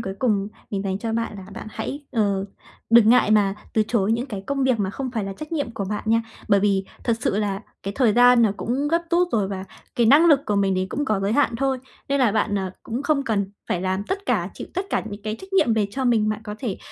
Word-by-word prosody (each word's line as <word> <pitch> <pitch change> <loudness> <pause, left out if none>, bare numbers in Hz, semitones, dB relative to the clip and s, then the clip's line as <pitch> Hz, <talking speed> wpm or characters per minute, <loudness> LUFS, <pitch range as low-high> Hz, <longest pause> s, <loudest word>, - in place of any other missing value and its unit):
cuối 190 0 -4
cùng 210 -5 +1 0.2
mình 200 -1 -2
dành 190 -1 -2
cho 225 +1 -3
bạn 230 -2 -2
là 190 -1 -9
bạn - - -8
hãy, 285 +5 -5
ờ, 200 -4 +1 0.5
đừng 230 -2 +7
ngại 235 -3 +5
mà 200 -2 +4 0.2
từ 220 - +4
chối 220 -2 +2
những 240 +4 -1
cái 200 -6 -6
công 275 -1 0
việc 255 -4 +2
mà 195 -2 -1
không 260 +3 -4
phải 220 -5 -2
là 195 - -4
trách 305 +10 -9
nhiệm 285 -7 -1
của 200 - -3
bạn 210 +2 -4
nha, 225 +1 +3 0.3
bởi 200 -2 +4
vì 195 -1 +2 0.2
thật 230 -2 +1
sự 200 - 0
là 200 0 -2 0.2
cái 195 - -4
thời 240 -6 +4
gian 245 0 +6
nó 220 - +4
cũng 270 +5 -1
gấp 335 +2 +1
rút 350 +1 +3
rồi 205 -4 +1
và 190 -1 -5 0.3
cái 235 -2 +3
năng 300 +8 +7
lực 290 -4 +6
của 205 - 0
mình 195 -1 +2
thì 185 0 0
cũng 290 +8 -2
có 215 -5 0
giới 200 +2 0
hạn 240 -4 +2
thôi. 270 0 0 0.3
Nên 280 0 +1
là 230 -5 +3
bạn, 205 -2 +1
à, 190 -1 -3
cũng 240 +5 -4
không 290 -2 +1
cần 200 -5 -1 0.2
phải 175 - 0
làm 190 +1 -1
tất 395 - -4
cả, 200 -7 0
chịu - - -7
tất 375 +2 -2
cả - - +1
những 205 0 -8
cái 215 +1 -3
trách 380 0 -12
nhiệm 240 -12 +3
về 210 -2 +1
cho 265 +4 -3
mình, 220 -3 +3
bạn 215 0 -2
có 210 -1 -6
thể, 225 -8 -3
220 Hz, 275 wpm, -23 LUFS, 200-260 Hz, 0.5 s, đừng